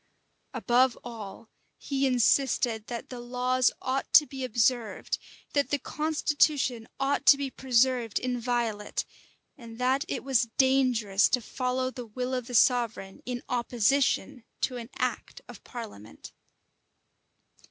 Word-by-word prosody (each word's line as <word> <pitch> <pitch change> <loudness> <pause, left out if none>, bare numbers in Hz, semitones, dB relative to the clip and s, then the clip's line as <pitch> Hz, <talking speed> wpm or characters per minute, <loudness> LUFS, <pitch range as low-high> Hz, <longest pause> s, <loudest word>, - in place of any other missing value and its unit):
[] - - -46
Above 250 0 +2
all, 225 -2 -9 0.3
he 275 -1 -1
insisted 245 -3 +2
that 235 -1 -6
the 250 - -7
laws 250 +1 +1
ought 265 +1 -2
to 300 - +8
be 270 -2 -7
observed, 235 -2 0 0.3
that 285 -1 +1
the 290 - +1
constitution 295 -5 0
ought 275 +1 0
to 280 - +7
be 280 -1 -3
preserved 250 -3 +1
inviolate, 240 -4 -2 0.5
and 230 -2 -11
that 260 +3 +1
it - - -4
was 255 -3 +1
dangerous 250 -7 +3
to 250 - +2
follow 255 +2 -2
the 245 -2 -8
will 250 +4 -4
of 250 -2 -3
the 245 - -5
sovereign, 230 -6 +2
in 245 -1 -4
opposition 250 +2 +1 0.2
to 255 - -1
an 235 -1 -8
act - - -3
of - - -12
parliament. 205 - -10
250 Hz, 130 wpm, -28 LUFS, 230-265 Hz, 0.5 s, to